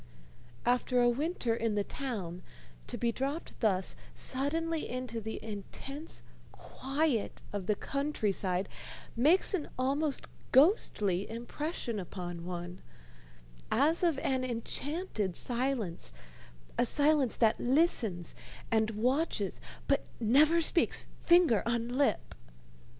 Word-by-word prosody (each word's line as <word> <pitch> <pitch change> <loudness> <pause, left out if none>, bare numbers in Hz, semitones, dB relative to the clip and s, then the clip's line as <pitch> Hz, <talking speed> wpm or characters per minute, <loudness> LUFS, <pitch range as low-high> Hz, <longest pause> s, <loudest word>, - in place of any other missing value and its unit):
After 245 0 +2
a 240 - +5
winter 260 -1 0
in 225 -2 0
the 205 - +1
town, 195 -10 -4 0.5
to - - -4
be 235 - +1
dropped 275 +7 -3
thus 190 -5 +2 0.2
suddenly 320 +5 0
into 250 -2 -4
the 220 +1 -5
intense 265 +8 -6 0.3
quiet 275 -3 -2
of 195 -3 -3
the 210 - +3
country 275 -4 -1
side 185 0 0 0.5
makes 310 - +4
an 345 -6 -1
almost 275 +3 0 0.3
ghostly 210 - +3
impression 240 0 -4
upon 175 -2 -6
one, 175 0 -6 0.9
as 300 +8 +3
of 335 -5 +2
an 260 -1 +1
enchanted 245 - -2
silence, 240 - -2 0.7
a - - +5
silence 290 -2 +3
that 225 -2 +3
listens 240 - +1 0.4
and 220 -1 +3
watches 235 - 0 0.3
but 275 - +1
never 295 +9 +5
speaks, 335 +2 +3 0.2
finger 340 - +5
on 235 0 0
lip. 275 +3 +1
245 Hz, 110 wpm, -32 LUFS, 210-290 Hz, 0.9 s, a